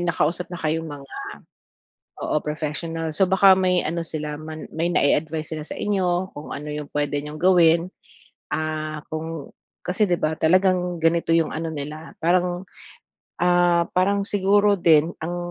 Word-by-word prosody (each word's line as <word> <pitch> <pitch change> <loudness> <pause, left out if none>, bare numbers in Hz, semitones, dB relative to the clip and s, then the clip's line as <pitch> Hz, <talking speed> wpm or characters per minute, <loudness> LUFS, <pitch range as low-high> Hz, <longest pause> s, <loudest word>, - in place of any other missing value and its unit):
nakausap 170 0 0
na 175 - -6
kayong 160 0 -2
mga 140 -2 -10 1.1
oo - - -1
professional, 155 +2 -3
so 185 +4 +2
baka 190 0 +7
may 185 -1 +2
ano 170 +2 -1
sila 150 -2 -5
man 155 0 -7
may 165 +2 0
nai-advice 155 0 +1
sila 155 - -4
sa 150 - -7
inyo 185 -2 0
kung 145 - -9
ano 150 +1 -5
yung 150 -1 -6
puwede 145 0 -1
niyong 150 +1 -8
gawin, 170 0 +4 0.6
ah, 155 -1 -3
kung 160 -2 -5 0.3
kasi 200 +4 +1
di 175 - +2
ba 155 +1 0
talagang 180 +1 +3
ganito 165 0 +2
yung 165 -1 +2
ano 165 +1 -3
nila 150 +2 -7
parang 180 +1 +1 0.8
ah, 175 -1 +3
parang 200 +2 +2
siguro 205 +1 +3
din 165 -2 +4
ang 175 +1 -3
165 Hz, 150 wpm, -23 LUFS, 155-180 Hz, 1.1 s, baka